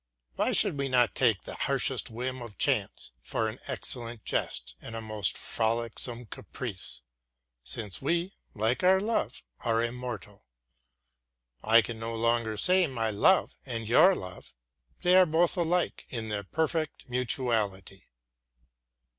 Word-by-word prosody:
Why - - +1
should 145 - +3
we 140 -1 -1
not 120 -6 +3
take 115 -7 +2
the - - -6
harshest - - 0
whim 125 +3 -4
of 115 -4 -9
chance - - 0
for 110 - -1
an 110 +2 -6
excellent 120 -4 -4
jest - - -2
and 115 - -8
a - - -3
most 110 -3 0
frolicsome 115 +2 -1
caprice, 105 - -4 0.6
since 105 - -5
we, 170 +6 0 0.2
like 110 - 0
our 190 +1 +5
love, 220 +3 -2 0.2
are 115 -1 +1
immortal? 115 -4 -5 1.2
I 115 +1 +5
can 115 -2 -6
no 115 0 -4
longer 115 -1 +1
say 180 - +5
my 115 -4 -1
love 145 - +3
and 115 -4 -4
your 185 - +6
love; 90 - -9 0.5
they 180 +1 +5
are 185 -1 +7
both 165 +3 +2
alike 175 0 0
in 115 -3 -4
their 100 -2 -3
perfect 160 - -2
mutuality. 115 -7 -1
120 Hz, 140 wpm, -29 LUFS, 110-140 Hz, 1.2 s, are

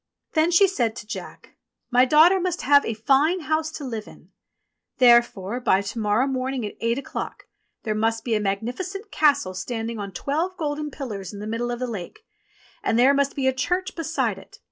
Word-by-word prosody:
Then 315 +1 +3
he 355 +3 +5
said 240 - -1
to 220 - -8
Jack, 225 - -9 0.4
"My 250 +1 +5
daughter 320 +7 +6
must 360 -1 -2
have 285 +1 +5
a 225 - -2
fine 280 +10 +2
house 315 0 0
to 300 - -6
live 225 -5 -5
in. - - -16 0.7
Therefore 235 -3 +4
by 195 -6 +2
to 200 +3 -5
morrow 215 +4 +2
morning 260 -2 -2
at 205 - -5
eight 230 +1 +1
o'clock 275 - -6 0.4
there 215 - -1
must 225 +1 0
be 235 - -1
a 215 - +2
magnificent 250 - -4
castle 285 -10 +2
standing 225 +4 -4
on 200 -1 -5
twelve 320 - -2
golden 300 -1 -3
pillars 215 - -6
in 200 - -8
the 210 - -6
middle 230 +2 -2
of 240 - -2
the 255 - -3
lake, 235 - -7 0.6
and 225 - 0
there 260 +3 +6
must 280 0 +1
be 275 - -1
a 265 - +3
church 365 +8 -2
beside 325 -1 -1
it. - - -16
255 Hz, 195 wpm, -24 LUFS, 225-310 Hz, 0.7 s, daughter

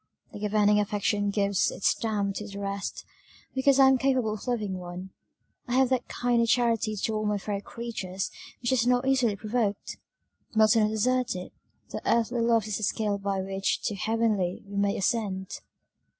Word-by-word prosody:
The - - -7
governing 210 0 +3
affection 205 0 0
gives 200 -1 +1
its 195 - +1
stamp 205 -3 -1
to 210 - -5
the 200 -1 -8
rest 200 0 -4 0.5
because 265 +1 +3
I 270 - +8
am 265 -1 +4
capable 255 -5 +1
of 215 - -8
loving 210 -6 -1
one, 180 +1 -8 0.6
I 245 - -1
have 260 -1 +4
that 260 -2 0
kind 240 -1 +1
of 230 - +2
charity 230 -2 +2
to 215 +2 -2
all 215 0 -1
my 210 0 +1
fellow 200 0 -3
creatures 200 -6 -5 0.3
which 240 - +1
is 245 -2 +2
not 250 +1 +2
easily 250 -6 +3
provoked. 210 0 -2 0.6
Milton 215 0 +5
has 220 0 -2
asserted, 250 -8 -1 0.4
That - - -4
earthly 235 +1 +1
love 230 -2 +3
is 215 -2 -2
the 215 - -6
scale 205 0 0
by 195 -1 -1
which 195 0 -1
to 210 - -1
heavenly 215 -3 0
we 200 0 -9
may 200 0 +1
ascend." 195 -2 -1
215 Hz, 180 wpm, -27 LUFS, 200-235 Hz, 0.6 s, I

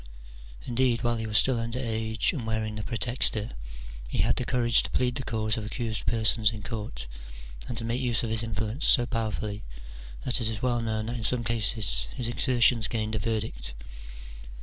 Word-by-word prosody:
Indeed, 120 -1 +1
while 120 0 +1
he 110 0 -3
was 110 0 +3
still 125 +1 +4
under 115 +1 -3
age 110 -1 0
and 125 -9 -4
wearing 110 -1 -1
the 105 - -4
praetexta, 115 0 0 0.6
he - - -4
had - - +3
the 125 - -2
courage 120 -2 +3
to - - -5
plead 125 -1 +1
the 135 +1 -4
cause 110 -1 0
of 110 - -3
accused 110 -3 -3
persons 110 -1 +3
in 110 -2 -8
court, 105 - -5 0.6
and 120 - -4
to 115 - +1
make 120 +3 -1
use 120 -3 +1
of 115 - -2
his 110 0 +1
influence 110 +4 -2
so 120 - +5
powerfully 110 -3 -3 0.6
that 125 0 +1
it 110 - +1
is 110 0 -5
well 120 -2 +1
known 110 -1 -2
that 120 +2 -3
in 115 - -5
some 120 +2 +3
causes 110 - +3
his. 120 - -1
exertions 120 -1 +3
gained 110 -2 -2
a 110 - 0
verdict. 100 - -3
115 Hz, 195 wpm, -27 LUFS, 110-120 Hz, 0.6 s, so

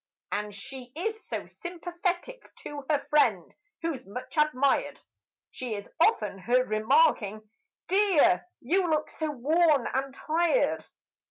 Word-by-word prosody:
And 210 0 -3
she 250 +4 -9
is 440 +6 -3
so - - -4
sympathetic: 350 +6 -4
to 290 -1 -6
a 295 -2 +1
friend, 225 - +2 0.3
who's 305 -6 -2
much 250 +9 -8
admired, 290 -3 +2 0.5
She 245 -4 -4
is 205 0 -7
often 215 - +2
heard 250 +5 +2
remarking, 215 - +2 0.4
"Dear, 360 -3 +4
you 360 +7 +1
look 305 -1 0
so 315 -1 -3
worn 295 +1 +3
and 270 +1 -1
tired!" 340 - +1
295 Hz, 120 wpm, -28 LUFS, 245-350 Hz, 0.5 s, Dear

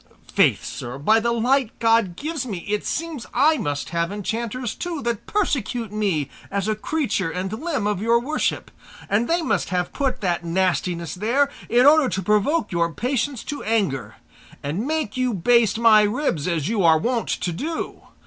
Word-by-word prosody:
Faith, - - +3
sir, 120 +2 -6
by 215 +11 +3
the 235 +1 0
light 245 +1 +1
God 225 -6 +2
gives 305 - -3
me, 200 -9 -6
it 210 0 -1
seems 320 -6 -4
I 310 +1 +4
must 145 -1 -3
have 170 0 -1
enchanters 230 +3 -3
too, 335 -5 -5
that 235 -3 -3
persecute 245 - -1
me 195 -9 0 0.2
as 200 0 -2
a 215 - +2
creature 215 - -1
and 185 +4 -4
limb 275 -2 -2
of 210 -2 0
your 230 +2 +3
worship, 285 +6 -2 0.4
and 220 +4 +1
they 340 0 +1
must - - 0
have 180 -1 -1
put 270 -2 -1
that 175 -3 0
nastiness 175 -1 -1
there 245 +9 +1 0.2
in 245 +2 +4
order 295 -2 +6
to 190 - -2
provoke 210 - +1
your 170 -1 +1
patience 250 - -2
to 290 - -5
anger, 140 - -1 0.5
and 165 - -2
make 310 -8 -2
you 255 -3 0
baste 230 +4 +3
my 225 -2 +6
ribs 210 - 0
as 165 -4 -1
you 215 -2 0
are 160 -1 +6
wont 235 +7 -1
to 175 - -1
do. 315 - -5
220 Hz, 175 wpm, -23 LUFS, 185-260 Hz, 0.5 s, order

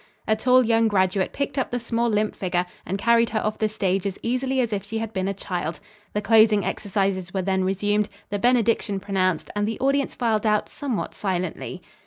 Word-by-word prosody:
A 220 - +3
tall 250 +3 +4
young 225 0 +3
graduate 190 -2 +1
picked 280 0 -2
up - - -1
the 245 - -2
small, 235 0 0
limp 210 0 0
figure 180 -1 -1 0.2
and 190 - -1
carried 235 +2 +3
her 215 - 0
off 215 0 -2
the 215 - +1
stage 195 -2 0
as 195 - -4
easily 260 +2 0
as 235 -4 0
if 200 - -2
she 220 +2 -5
had 225 0 -4
been 190 -1 -1
a 200 - 0
child. 175 -4 -4 0.3
The 210 - -1
closing 215 -2 +5
exercises 195 -2 -1
were 190 - 0
then 190 0 +1
resumed, 205 +2 +1 0.2
the 205 - -1
benediction 230 -3 +2
pronounced 185 -4 -1
and 205 0 0
the 225 - -3
audience 275 0 +1
filed 225 -4 +1
out 210 -1 +2
somewhat 265 -7 -3
silently. 185 -1 -3
210 Hz, 205 wpm, -24 LUFS, 190-230 Hz, 0.3 s, closing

